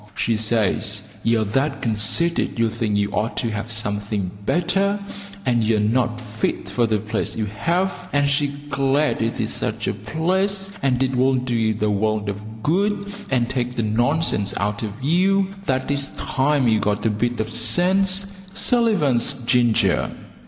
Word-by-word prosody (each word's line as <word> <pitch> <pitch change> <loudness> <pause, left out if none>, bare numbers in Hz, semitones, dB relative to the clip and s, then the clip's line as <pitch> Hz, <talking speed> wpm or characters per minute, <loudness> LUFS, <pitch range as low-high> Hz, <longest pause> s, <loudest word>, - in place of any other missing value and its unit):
She 115 - 0
says 110 -1 +1 0.2
you 115 -1 +2
are - - 0
that 135 +6 -1
conceited 115 - +1
you 115 -1 +1
think 110 -3 -1
you 100 0 0
ought 110 +3 -2
to 115 - -1
have 110 +2 -4
something 105 -3 -2 0.2
better, 195 +4 +1 0.5
and 120 -3 +2
you're 110 0 +2
not 120 +3 +1
fit 110 -2 -3
for 120 -2 +1
the 110 -1 +1
place 105 +1 -2
you 110 - -1
have, 175 - -2
and 145 0 +2
she's 140 +1 +1 0.2
glad 140 +1 +1
it 115 0 -1
is - - -1
such - - -3
a - - 0
place, 190 - 0
and 130 -1 +2
it 130 0 -1
will 130 +1 +3
do 125 -1 -1
you 110 -1 +1
the 105 0 0
world 105 0 0
of 105 +2 -8
good 200 +4 0 0.2
and 125 -3 +1
take 125 -1 -2
the 115 - -1
nonsense 110 -2 +1
out 105 +1 -2
of 110 +3 -6
you 190 +5 +2
that 130 +1 0
it's 140 0 +2
time 135 -1 +1
you 110 -1 +3
got 105 0 -1
a 110 - +3
bit 120 +3 -1
of 110 +1 -3
sense. 190 +2 +3 0.3
Sullivan's 205 - +3
Ginger. 115 -6 +2
120 Hz, 170 wpm, -22 LUFS, 110-150 Hz, 0.5 s, will